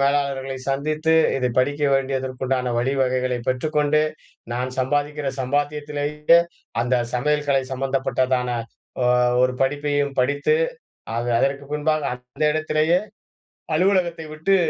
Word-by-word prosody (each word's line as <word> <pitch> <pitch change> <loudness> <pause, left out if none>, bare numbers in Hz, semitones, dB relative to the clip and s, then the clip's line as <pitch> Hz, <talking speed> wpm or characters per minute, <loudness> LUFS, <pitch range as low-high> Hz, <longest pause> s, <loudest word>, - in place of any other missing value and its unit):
மேலாளர்களை 140 -1 0
சந்தித்து, 155 +3 0 0.2
இதை 125 -2 0
படிக்க 145 +3 +1
வேண்டியதற்கு 130 -1 -2
உண்டான 125 -1 0
வழிவகைகளைப் 130 -1 0
பெற்றுக்கொண்டு, 150 +3 +1 0.5
நான் 125 +1 -2
சம்பாதிக்கிற 145 +2 0
சம்பாத்தியத்திலேயே 145 +3 +1 0.4
அந்த 125 +1 +1 0.2
சமையல்கலை 145 +1 +1
சம்பந்தப்பட்டதான 130 -1 0 0.5
ஒ - - +3 0.4
ஒரு 130 0 +3
படிப்பையும் 145 0 0
படித்து, 145 - +2 0.6
அத 120 +1 -1
அதற்கு 140 +1 0
பின்பாக 155 +1 +1
அந்த 125 +4 -6
இடத்திலேயே 155 +2 +2 0.8
அலுவலகத்தை 175 -2 +1
விட்டு, 195 +6 +2
140 Hz, 100 wpm, -22 LUFS, 130-150 Hz, 0.8 s, ஒ